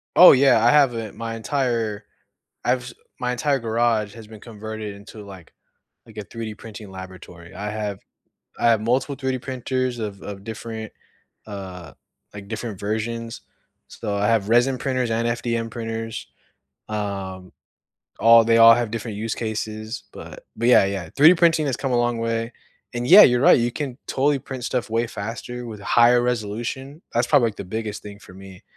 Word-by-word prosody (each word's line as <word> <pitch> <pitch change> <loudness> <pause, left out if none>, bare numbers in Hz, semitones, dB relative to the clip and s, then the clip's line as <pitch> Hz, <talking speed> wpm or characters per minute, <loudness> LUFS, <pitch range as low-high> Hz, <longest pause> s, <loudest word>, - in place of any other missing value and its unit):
Oh, 180 - +10
yeah. 130 -4 +5
I 120 - +6
have 140 -5 +5
it 110 -2 -6
my 115 0 -5
entire 115 -4 -2 0.6
I've 125 0 +1
s 125 -2 -9 0.3
my 125 0 -1
entire 135 +2 0
garage 115 -2 0
has 110 -2 -11
been 110 -1 -12
converted 110 -2 -7
into, 105 +1 -12
like 95 -4 -13 0.5
like, 110 -2 -17
a 105 - -4
3D 115 -2 -6
printing 110 -3 -10
laboratory. 95 -2 -11
I 105 +1 -5
have 105 -2 -4 0.6
I 120 - +3
have 115 -2 +4
multiple 130 +5 0
3D 130 -2 -2
printers 130 -1 -3
of 100 -3 -5
of 100 -1 -8
different, 110 0 -7 0.6
uh, 95 -5 -8 0.4
like, 100 -1 -10
different 110 -2 -6
versions. 115 +2 -4 0.5
So, 105 -3 -5
I 100 +1 +1
have 110 -2 +1
resin 125 +3 +3
printers 130 -3 -1
and 115 +1 0
FDM 115 -1 -2
printers. 115 0 -5 0.6
Um, 95 -3 -5 0.7
all 115 0 +7
they 115 0 +3
all 115 0 +9
have 120 -2 -2
different 115 -2 -5
use 110 +1 -3
cases, 110 +1 -5
but - - -11
but, 120 - 0
yeah, 120 - +7
yeah. 95 -4 -3
3D 160 +5 +8
printing 165 -3 +3
has 130 - -1
come 135 -2 -3
a - - +2
long 120 -1 0
way 115 0 -2 0.4
and 120 +1 -2
yeah, 200 +8 +10
you're 125 -1 +5
right, 135 - +6
you 120 0 0
can 135 -5 -5
totally 140 +1 +1
print 130 -1 -8
stuff 125 -4 -2
way 115 +1 0
faster 120 +4 -6
with 110 -3 -8
higher 120 +3 +4
resolution. 125 +5 -3
That's 120 +1 +2
probably, 120 -2 +4
like, 105 - -9
the - - -6
biggest 110 +2 -5
thing 105 0 -10
for 95 - -15
me, 95 -1 -13
115 Hz, 175 wpm, -22 LUFS, 105-125 Hz, 0.7 s, Oh